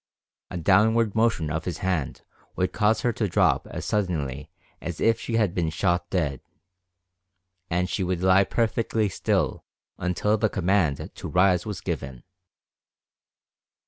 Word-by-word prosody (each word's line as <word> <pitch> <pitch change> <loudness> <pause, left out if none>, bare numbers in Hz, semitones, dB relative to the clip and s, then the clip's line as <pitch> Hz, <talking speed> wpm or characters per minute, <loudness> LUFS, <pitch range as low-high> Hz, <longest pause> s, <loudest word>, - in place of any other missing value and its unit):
A 90 - -5
downward 105 +5 +3
motion 110 -9 +1
of 80 +1 -3
his 90 -3 -3
hand 85 -9 -2 0.3
would 90 - -1
cause 110 0 +2
her 120 - +1
to 105 - -1
drop 90 - +2
as - - -6
suddenly 75 -9 -2 0.3
as 85 -2 -5
if 115 0 +3
she 115 - -3
had 105 -6 +2
been 85 -3 0
shot 85 +1 0
dead, 75 -8 -1 1.3
and 90 +1 0
she 95 - -2
would 90 0 -2
lie 95 +1 +5
perfectly 110 0 0
still - - -1 0.4
until 105 +4 0
the 110 - +2
command 95 -7 +1
to - - -7
rise 90 +1 +2
was 100 -2 -5
given. 70 -9 -5
95 Hz, 145 wpm, -25 LUFS, 85-105 Hz, 1.3 s, lie